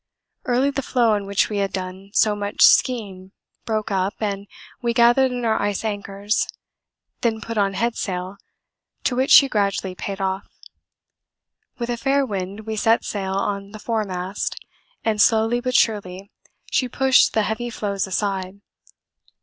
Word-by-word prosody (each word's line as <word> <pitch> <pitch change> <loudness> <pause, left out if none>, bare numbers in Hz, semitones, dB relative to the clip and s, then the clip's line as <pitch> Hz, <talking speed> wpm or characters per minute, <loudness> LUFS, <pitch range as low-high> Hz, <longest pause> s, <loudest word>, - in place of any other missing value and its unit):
Early 255 +3 +2
the 275 0 -2
floe 245 -3 +2
on 205 -1 -2
which 200 0 +2
we 210 - -4
had 195 -1 0
done 185 +1 -6
so 210 -1 +4
much 205 0 0
ski 255 -1 +6
ing 185 0 -13 0.3
broke 215 -1 -2
up, 190 +1 0
and 200 -2 -3 0.3
we 235 -1 -1
gathered 240 +3 +5
in 245 -1 -3
our 220 -1 +1
ice 205 +1 -1
anchors, 205 0 -1 0.7
then 225 -2 0
put 230 +1 -6
on 200 -2 +1
head 235 +3 0
sail, 185 0 -4 0.7
to 250 - 0
which 260 +2 +1
she 275 - +8
gradually 200 -5 -1
paid 195 +2 -5
off. 190 0 -2 1.3
With 240 -2 -3
a 240 - -2
fair 275 +3 +1
wind 200 -2 -4
we 220 0 -5
set 225 +2 +2
sail 190 -2 -3
on 200 +1 -2
the 215 - -8
foremast, 200 -4 -3 0.5
and 215 -2 +2
slowly 225 +2 +3
but 255 0 -2
surely 200 -2 0 0.4
she 255 - +1
pushed 265 +1 +4
the 220 - +2
heavy 230 +3 -3
floes 200 -4 -2
aside. 190 0 -2
210 Hz, 160 wpm, -22 LUFS, 195-235 Hz, 1.3 s, she